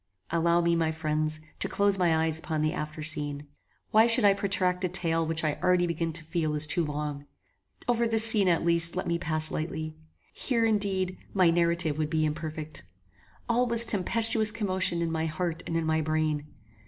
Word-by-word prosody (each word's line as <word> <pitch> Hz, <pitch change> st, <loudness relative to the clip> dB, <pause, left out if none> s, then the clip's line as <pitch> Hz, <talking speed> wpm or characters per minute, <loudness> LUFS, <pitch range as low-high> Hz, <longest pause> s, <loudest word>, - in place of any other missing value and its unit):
Allow 170 Hz, +1 st, +2 dB
me, 170 Hz, 0 st, +1 dB
my 165 Hz, -1 st, 0 dB
friends, 155 Hz, -1 st, -2 dB, 0.2 s
to -, -, -1 dB
close 200 Hz, -1 st, +1 dB
my 165 Hz, -3 st, +2 dB
eyes 160 Hz, 0 st, -2 dB
upon 155 Hz, -2 st, -3 dB
the 155 Hz, -, 0 dB
after 155 Hz, 0 st, -6 dB
scene. 145 Hz, -2 st, -1 dB, 0.5 s
Why 220 Hz, +2 st, +5 dB
should 230 Hz, -1 st, +4 dB
I 200 Hz, -, +6 dB
protract 185 Hz, -2 st, -1 dB
a 185 Hz, -, 0 dB
tale 165 Hz, -2 st, -1 dB
which 160 Hz, 0 st, 0 dB
I 150 Hz, -2 st, -2 dB
already 180 Hz, -1 st, +2 dB
begin 165 Hz, -1 st, -2 dB
to 165 Hz, 0 st, -2 dB
feel 160 Hz, -1 st, -2 dB
is 150 Hz, +1 st, +2 dB
too 160 Hz, +3 st, +1 dB
long? 150 Hz, -1 st, -5 dB, 0.6 s
Over 235 Hz, -1 st, +1 dB
this 225 Hz, -1 st, +3 dB
scene 215 Hz, -4 st, +4 dB
at 170 Hz, -2 st, +1 dB
least 170 Hz, 0 st, +6 dB
let 185 Hz, -, -3 dB
me 170 Hz, 0 st, -1 dB
pass 155 Hz, -1 st, -1 dB
lightly. 155 Hz, 0 st, -5 dB, 0.4 s
Here, 235 Hz, -4 st, -1 dB
indeed, 195 Hz, -4 st, -1 dB, 0.2 s
my 180 Hz, -3 st, +4 dB
narrative 170 Hz, -2 st, +1 dB
would 155 Hz, -1 st, -1 dB
be 155 Hz, -1 st, 0 dB
imperfect. 155 Hz, 0 st, -5 dB, 0.7 s
All 245 Hz, +1 st, +1 dB
was 235 Hz, 0 st, +7 dB
tempestuous 220 Hz, +2 st, +1 dB
commotion 185 Hz, -5 st, -1 dB
in 165 Hz, -, -2 dB
my 160 Hz, 0 st, -2 dB
heart 165 Hz, +1 st, -3 dB
and 165 Hz, -, -2 dB
in 165 Hz, -, -2 dB
my 160 Hz, 0 st, 0 dB
brain. 155 Hz, -1 st, -2 dB
170 Hz, 190 wpm, -27 LUFS, 155-185 Hz, 0.7 s, was